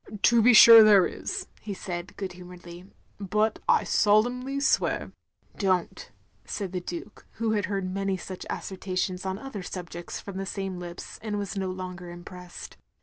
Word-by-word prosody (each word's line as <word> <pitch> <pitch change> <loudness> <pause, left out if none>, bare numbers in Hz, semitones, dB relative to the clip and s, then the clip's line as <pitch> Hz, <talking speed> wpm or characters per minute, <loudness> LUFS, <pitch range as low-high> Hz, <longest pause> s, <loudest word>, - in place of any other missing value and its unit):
" 205 - -10
To 235 -1 +5
be 245 +3 +6
sure 230 +1 +11
there 205 -3 +6
is, - - -4
" - - -28
he 205 -2 -5
said, 180 0 -6
good 190 -2 -5
humouredly. 180 0 -12 0.3
"But 210 +2 0
I - - +5
solemnly 245 +6 +2
swear 280 - +1
— - - -57
" - - -45
" - - -29
Don't, 185 -3 -1 0.2
" - - -40
said 195 -4 -5
the 180 -1 -3
Duke, 175 +4 -8
who 225 -1 -1
had 210 -2 0
heard 195 -1 -2
many 195 +1 -2
such 185 +1 -8
asseverations 185 -1 -3
on 190 0 -2
other 220 -3 -7
subjects 175 -1 -7
from 200 -2 -8
the 195 - -3
same 195 -2 -4
lips, 175 -1 -8
and 215 -2 -3
was 200 0 -4
no 190 -1 -2
longer 180 -1 -7
impressed. 175 +1 -10
190 Hz, 190 wpm, -27 LUFS, 180-210 Hz, 0.3 s, sure